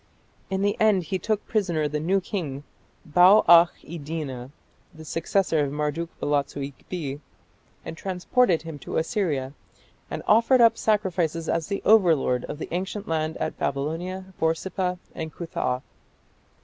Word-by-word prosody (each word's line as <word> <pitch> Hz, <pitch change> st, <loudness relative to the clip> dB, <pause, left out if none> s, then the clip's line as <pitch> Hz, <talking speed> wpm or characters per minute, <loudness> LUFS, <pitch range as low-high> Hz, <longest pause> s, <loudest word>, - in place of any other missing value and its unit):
In 190 Hz, 0 st, -1 dB
the 205 Hz, 0 st, +2 dB
end 210 Hz, -4 st, +4 dB
he 185 Hz, +4 st, -3 dB
took 215 Hz, 0 st, -1 dB
prisoner 175 Hz, -8 st, 0 dB
the 150 Hz, +1 st, -2 dB
new 185 Hz, +6 st, +1 dB
king, 155 Hz, -8 st, -5 dB, 0.4 s
Bau 180 Hz, +7 st, +6 dB
akh 170 Hz, 0 st, +7 dB
iddina, 150 Hz, -5 st, -6 dB, 0.4 s
the 160 Hz, 0 st, -12 dB
successor 165 Hz, +1 st, 0 dB
of 145 Hz, -2 st, 0 dB
Marduk 150 Hz, +3 st, -2 dB
balatsu 140 Hz, -1 st, -1 dB
ikbi, 145 Hz, -3 st, -6 dB, 0.7 s
and -, -, -6 dB
transported 185 Hz, +2 st, +1 dB
him 160 Hz, -3 st, -8 dB
to -, -, -4 dB
Assyria, 160 Hz, -, -1 dB, 0.6 s
and -, -, -5 dB
offered 235 Hz, +4 st, +5 dB
up 230 Hz, -1 st, +6 dB
sacrifices 180 Hz, -7 st, 0 dB
as 165 Hz, -2 st, -1 dB
the 200 Hz, -1 st, -3 dB
overlord 165 Hz, -, +4 dB
of -, -, -6 dB
the -, -, -6 dB
ancient 190 Hz, +3 st, -3 dB
land 160 Hz, 0 st, -1 dB
at -, -, -4 dB
Babylon, 175 Hz, +7 st, -3 dB
Borsippa, 180 Hz, +3 st, -1 dB, 0.2 s
and 160 Hz, -1 st, -5 dB
Cuthah. 130 Hz, -6 st, -3 dB
165 Hz, 140 wpm, -25 LUFS, 150-190 Hz, 0.7 s, akh